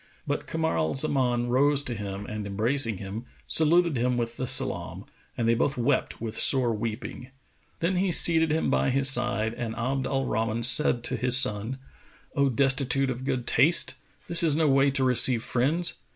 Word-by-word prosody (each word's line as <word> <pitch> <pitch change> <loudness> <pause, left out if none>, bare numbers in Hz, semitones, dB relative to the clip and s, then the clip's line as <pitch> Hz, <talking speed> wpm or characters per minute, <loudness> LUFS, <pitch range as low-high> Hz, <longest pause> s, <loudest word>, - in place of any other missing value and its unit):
But - - -4
Kamar 160 0 -2
al 80 - -2
Zaman 125 -4 0
rose 140 +3 +2
to 125 - -4
him 100 -2 -7
and 105 -1 -7
embracing 110 +2 -1
him, 100 +5 -8 0.2
saluted 165 0 +3
him 125 +1 -1
with 115 -1 -4
the 130 - -5
salam, - - 0 0.3
and 115 - -2
they 115 - +3
both 130 +4 -2
wept 120 - -2
with 115 -1 -6
sore 125 -4 +4
weeping. 115 +3 -7 0.5
Then 180 +2 -1
he 190 0 -1
seated 165 -1 +4
him 160 +1 -1
by - - 0
his 135 +1 +2
side 110 -4 +1
and 115 -2 -6
Abd 130 +3 -3
al 135 -1 -2
Rahman 115 +1 -3
said 120 -1 +3
to 130 - -5
his 125 +1 +3
son, 110 0 +1 0.6
"O 140 -1 +1
destitute 135 +1 +1
of 130 +1 -7
good 130 -3 -3
taste, 150 +8 +3 0.3
this 170 - +4
is 160 -4 +2
no 160 0 +1
way 135 0 +2
to 135 -1 -2
receive 125 -2 +3
friends! 150 +8 0
130 Hz, 180 wpm, -25 LUFS, 115-140 Hz, 0.6 s, sore